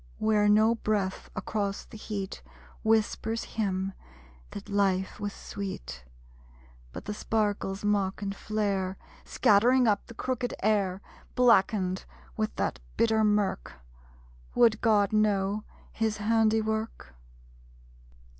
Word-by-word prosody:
Where 210 -1 +3
no 215 +2 +5
breath 210 -4 -2
across 205 -1 -2
the - - -14
heat 205 - -5 0.4
Whispers 220 +1 +1
him 195 -3 -2 0.6
that 200 - -8
life 195 -2 0
was 205 -1 -3
sweet; 190 - -7 0.9
But - - -8
the 210 - -3
sparkles 205 -2 -1
mock 200 -2 +1
and 195 0 -3
flare, 195 -3 -1 0.3
Scattering 240 +5 +4
up 205 -2 +1
the 235 - -11
crooked 250 0 -2
air. 200 -3 +1 0.3
(Blackened 200 -6 +3 0.3
with 215 0 -2
that - - -1 0.2
bitter 220 -1 +3
mirk, 210 - +1 0.8
Would 225 -3 +4
God 210 -3 +3
know 210 -1 +1 0.3
His 220 -1 -1
handiwork?) 220 - 0
210 Hz, 110 wpm, -28 LUFS, 195-220 Hz, 0.9 s, no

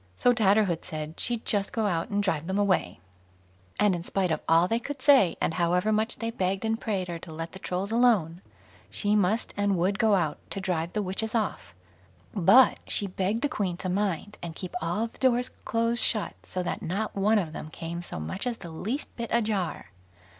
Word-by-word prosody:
So 245 - +4
Tatterhood 200 -6 +2
said 155 0 -6
she'd 235 -2 -2
just 200 -2 0
go 220 -2 -1
out 175 +1 -1
and 205 -1 0
drive 165 -5 0
them 190 +1 -1
away; 185 - +1 0.8
and 210 -2 +4
in 175 -1 -3
spite 185 -1 -1
of 155 - 0
all 165 +2 +5
they 230 +4 +1
could 280 +3 -6
say, 255 - +5
and - - 0
however 180 +4 +1
much 220 +2 0
they 230 0 -3
begged 195 -1 -1
and 225 0 -1
prayed 195 -4 -1
her 170 -1 -5
to 160 - -11
let 165 +1 -6
the 190 - -10
Trolls 190 +2 -3
alone, 215 -8 +3 0.5
she 210 0 0
must 210 +3 +1
and 205 -2 +1
would 190 +4 0
go 220 -3 +4
out 165 -6 0
to - - -4
drive 175 -3 -2
the 210 - -1
witches 215 +4 -2
off; 205 - -2 0.6
but 225 +7 +6
she 205 - 0
begged 195 +4 -2
the - - +3
Queen 195 - -2
to 185 - -4
mind 200 +1 -2
and 170 -2 -6
keep 185 +1 -7
all 175 +7 -1
the 230 - -11
doors 250 -1 +2 0.2
close 230 0 +3
shut, 215 -4 +3
so 185 - -4
that - - -3
not 195 +5 -3
one 210 +3 +3
of 165 -6 -1
them 155 - -7
came 165 +2 -6
so 175 - -5
much 190 - -3
as 240 -2 -2
the 170 -6 -9
least 225 - -4
bit 235 -2 -4
ajar. 210 - -1
195 Hz, 210 wpm, -27 LUFS, 175-220 Hz, 0.8 s, but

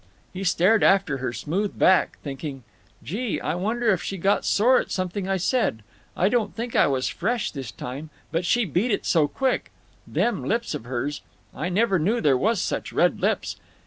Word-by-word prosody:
He 190 +1 -5
stared 190 +4 +3
after 190 -8 +3
her 130 -2 -3
smooth 185 - -2
back, 185 -1 +4
thinking: 140 -2 -6 0.4
"Gee! 210 - -2
I - - -2
wonder 220 +6 0
if 185 - 0
she 195 - -4
got 195 +3 +1
sore 245 +5 +4
at - - -4
something 185 +1 -3
I 195 - +1
said. 180 - 0 0.3
I 185 - +3
don't 215 -1 0
think 235 +1 -4
I - - +5
was 130 -2 0
fresh 230 +4 -1
this 135 -6 -6
time. 135 +5 -7 0.2
But 165 +2 0
she 235 +6 +2
beat 190 - 0
it 205 - -1
so 160 -4 +3
quick…. 260 - -1 0.4
Them 240 - 0
lips 235 +1 -1
of 110 - -5
hers—I 140 +5 -5
never 195 0 +2
knew 210 +10 +1
there 145 -8 +3
was 210 - +1
such - - -2
red - - +2
lips. - - 0
185 Hz, 185 wpm, -24 LUFS, 150-220 Hz, 0.4 s, I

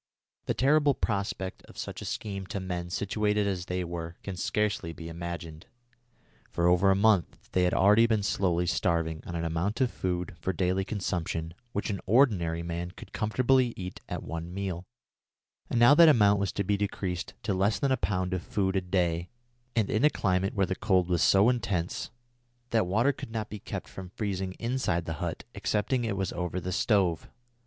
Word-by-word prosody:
The - - 0
terrible 145 +1 +4
prospect 100 -1 -2
of - - -15
such - - -5
a - - -6
scheme 100 -3 -4
to 100 - -3
men 90 -2 -4
situated 105 +2 0
as 95 -3 -2
they 90 0 -1
were 85 -1 -5
can 95 - -5
scarcely 100 -3 -1
be 80 0 -8
imagined. 85 -1 -6 0.8
For 85 - -1
over 90 +2 +5
a 95 - +5
month 100 -4 +2
they 90 -1 +3
had 90 - +1
already 105 +4 +6
been 110 -3 +1
slowly 90 -3 +1
starving 85 -2 0
on 85 - -5
an 85 0 -2
amount 85 - -1
of 130 -3 +2
food 90 -1 -3
for 95 +4 -1
daily 95 +2 +1
consumption 85 -5 -3 0.2
which 105 0 -2
an 100 - -4
ordinary 95 -9 +3
man 85 +1 -4
could 95 +3 -13
comfortably 125 +2 +2
eat 90 -1 -6
at - - -4
one 85 +1 -5
meal, 95 -2 -4 0.8
and 120 - +1
now 120 +4 +8
that 165 +2 +8
amount 105 -7 +5
was 100 -1 0
to 100 - -1
be 100 +1 +1
decreased 95 -3 -3
to 100 - 0
less 95 +3 +2
than 140 - 0
a - - +5
pound 95 -4 -1
of 90 - -1
food 95 0 -1
a 95 - +2
day 90 -2 0 0.5
and 110 -4 +1
in 110 - +1
a 150 - +7
climate 95 -5 0
where 100 -2 +3
the 95 - -2
cold 95 -3 +1
was 85 -3 +2
so 100 +6 +5
intense 100 -9 -1 0.6
that 110 -5 +2
water 115 +9 +3
could - - -8
not 110 -2 -4
be 105 - -5
kept - - -6
from 95 -1 -9
freezing 95 -2 -3
inside 115 -8 -1
the 80 - -3
hut - - -3
excepting 115 +4 0
it 110 -4 -1
was 95 -2 -2
over 90 +1 -2
the 90 0 -4
stove. 95 -4 +1
95 Hz, 195 wpm, -29 LUFS, 90-105 Hz, 0.8 s, now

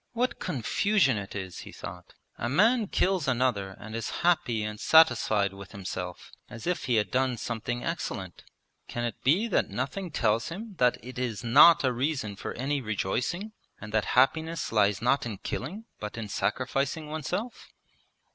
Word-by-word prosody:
'What 240 0 -1
confusion 140 - +1
it 100 0 -8
is,' 95 -2 -5
he - - -9
thought. - - -10 0.2
'A 120 - -1
man 220 - +4
kills 185 -5 +1
another 120 -7 0
and 110 +1 -8
is 115 -1 -3 0.2
happy 125 -11 +2
and 105 0 -5
satisfied 110 - +4
with 100 -1 -11
himself 90 -2 -6 0.2
as 115 -2 -9
if 180 0 -1
he 125 - +2
had 105 -2 +1
done 130 -1 +1
something 120 +2 -3
excellent. 95 - -4 0.4
Can 120 - -4
it 120 -3 -4
be 180 - +3
that - - +1
nothing 195 -3 -3
tells 115 -5 +1
him 205 +6 -7
that 125 -1 +4
it 125 0 -7
is 115 -6 -3
not 145 +8 +7
a 130 -2 +2
reason 125 -5 -1
for - - -5
any 140 +3 -1
rejoicing, 125 - -2 0.3
and 105 -1 -9
that 110 -1 +2
happiness 160 +5 +2
lies 105 -1 +2
not 125 0 +2
in 105 -4 -5
killing, 180 - -5
but 105 +1 -6
in 115 -2 -4
sacrificing 130 +10 -1
oneself?' 160 - -4
125 Hz, 165 wpm, -28 LUFS, 105-160 Hz, 0.4 s, not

